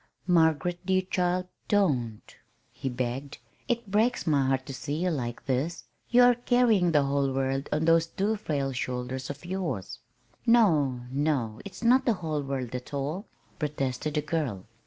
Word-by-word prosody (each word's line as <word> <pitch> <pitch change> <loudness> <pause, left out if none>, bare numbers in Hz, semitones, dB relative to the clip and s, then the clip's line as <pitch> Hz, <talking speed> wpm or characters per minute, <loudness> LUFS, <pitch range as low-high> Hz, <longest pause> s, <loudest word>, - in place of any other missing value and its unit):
"Margaret, 175 0 +2
dear 185 0 +2
child, 180 0 0 0.2
don't!" 130 - +1 0.5
he 135 - -4
begged. 130 +3 -3 0.3
"It 235 -5 -2
breaks 225 +4 +2
my 140 -4 +2
heart 130 0 0
to 135 - -6
see 145 +2 -4
you 180 +3 0
like 120 -6 -4
this. 145 +6 -1 0.3
You 245 +1 +6
are 245 0 +7
carrying 240 -7 +3
the 145 -3 +4
whole 140 0 +1
world 135 +1 -1
on 155 +2 +1
those 165 0 +4
two 205 +5 0
frail 145 -9 -2
shoulders 125 +1 -4
of 145 +4 -7
yours." 175 - -3 0.4
"No, 160 - +4
no, 135 -6 -1
it's 200 - -9
not 250 +3 +5
the 235 - +5
whole 160 -6 -2
world 135 -3 -4
at 125 +3 -5
all," 150 +9 -3 0.3
protested 150 -1 -2
the 150 - +1
girl. 145 - -2
150 Hz, 160 wpm, -28 LUFS, 135-185 Hz, 0.5 s, are